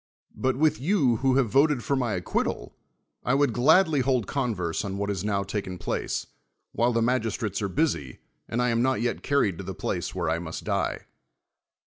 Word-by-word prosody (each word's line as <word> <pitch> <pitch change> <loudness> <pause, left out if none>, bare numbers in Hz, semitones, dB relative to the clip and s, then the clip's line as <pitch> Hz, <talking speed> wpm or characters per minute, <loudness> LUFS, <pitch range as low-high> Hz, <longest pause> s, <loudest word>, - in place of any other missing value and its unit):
But 130 0 0
with 155 0 +2
you 140 - +2
who 130 +1 +2
have 130 -6 +2
voted 140 -2 +3
for 140 - 0
my 125 -5 0
acquittal, 90 -8 -2 0.5
I 125 - +2
would 140 -4 +2
gladly 160 - +4
hold 130 -4 +1
converse 105 - -2
on 100 -1 -4
what 100 0 -2
has 100 -3 -2
now 100 -2 0
taken 95 -2 -4
place, 85 - -2 0.5
while 120 +1 +2
the 115 -1 +1
magistrates 115 -4 -1
are 100 - -1
busy 85 - -1 0.3
and 120 +2 0
I 125 - +2
am 115 0 +1
not 130 +1 +2
yet 120 - -1
carried 105 -12 +1
to - - -5
the 95 0 -6
place - - -3
where - - -1
I 85 - +1
must 80 -1 -6
die. - - -1
120 Hz, 190 wpm, -26 LUFS, 100-135 Hz, 0.5 s, gladly